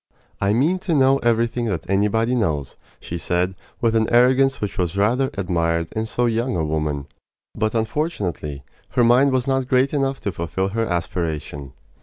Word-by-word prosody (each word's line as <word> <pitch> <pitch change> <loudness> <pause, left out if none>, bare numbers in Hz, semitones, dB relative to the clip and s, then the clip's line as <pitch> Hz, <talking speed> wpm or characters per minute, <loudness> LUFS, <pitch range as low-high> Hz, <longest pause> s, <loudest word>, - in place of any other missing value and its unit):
"I 100 +1 +2
mean 155 +11 +2
to 175 -3 -1
know 135 0 +4
everything 120 +1 +1
that 95 -8 -3
anybody 105 +5 +1
knows," 80 - -1 0.2
she 85 - -6
said, 90 +2 0 0.3
with 115 -1 +2
an 110 -1 +2
arrogance 130 +3 +4
which 105 -1 -4
was 90 +1 -1
rather 125 +7 +2
admired 85 -3 0
in 110 0 -3
so 120 +2 0
young 115 -2 0
a 80 - 0
woman. 75 -2 -2 0.5
But, 110 +1 -1
unfortunately, 105 - -2 0.3
her 125 - +3
mind 125 +4 +5
was 130 -1 0
not 135 -1 0
great 130 +2 +2
enough 135 -1 0
to 100 - -2
fulfil 90 +3 -2
her 115 +2 -1
aspiration. 80 -5 -3
110 Hz, 170 wpm, -22 LUFS, 85-125 Hz, 0.5 s, mind